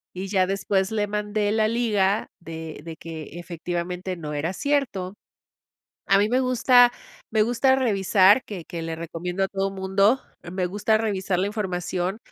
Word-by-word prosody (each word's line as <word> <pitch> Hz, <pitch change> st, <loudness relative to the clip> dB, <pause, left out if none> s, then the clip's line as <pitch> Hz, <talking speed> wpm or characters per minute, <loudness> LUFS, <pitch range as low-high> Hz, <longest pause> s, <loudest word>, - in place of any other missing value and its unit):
Y 190 Hz, +2 st, -4 dB
ya 190 Hz, -2 st, +2 dB
después 195 Hz, +1 st, 0 dB
le 210 Hz, -1 st, 0 dB
mandé 210 Hz, 0 st, -1 dB
la 215 Hz, 0 st, +2 dB
liga 215 Hz, -3 st, +1 dB
de 160 Hz, -2 st, -8 dB
de 165 Hz, 0 st, -7 dB
que, 160 Hz, +1 st, -8 dB
efectivamente, 175 Hz, +2 st, -4 dB
no 150 Hz, -3 st, -6 dB
era 155 Hz, +5 st, -2 dB
cierto. 225 Hz, -9 st, -1 dB, 0.9 s
A 195 Hz, -, +5 dB
mí 205 Hz, +1 st, +3 dB
me 255 Hz, +2 st, +3 dB
gusta 250 Hz, -1 st, +5 dB, 0.4 s
me 220 Hz, -1 st, +3 dB
gusta 245 Hz, +3 st, +3 dB
revisar, 200 Hz, -2 st, +4 dB
que 190 Hz, -6 st, -7 dB
que 170 Hz, -1 st, -6 dB
le 165 Hz, 0 st, -4 dB
recomiendo 175 Hz, +3 st, -3 dB
a 195 Hz, -, -2 dB
todo 195 Hz, 0 st, -1 dB
mundo, 195 Hz, +5 st, +2 dB, 0.3 s
me 185 Hz, 0 st, -1 dB
gusta 210 Hz, +4 st, +1 dB
revisar 195 Hz, -4 st, -1 dB
la 190 Hz, -, +1 dB
información. 190 Hz, -1 st, -2 dB
195 Hz, 160 wpm, -24 LUFS, 180-215 Hz, 0.9 s, A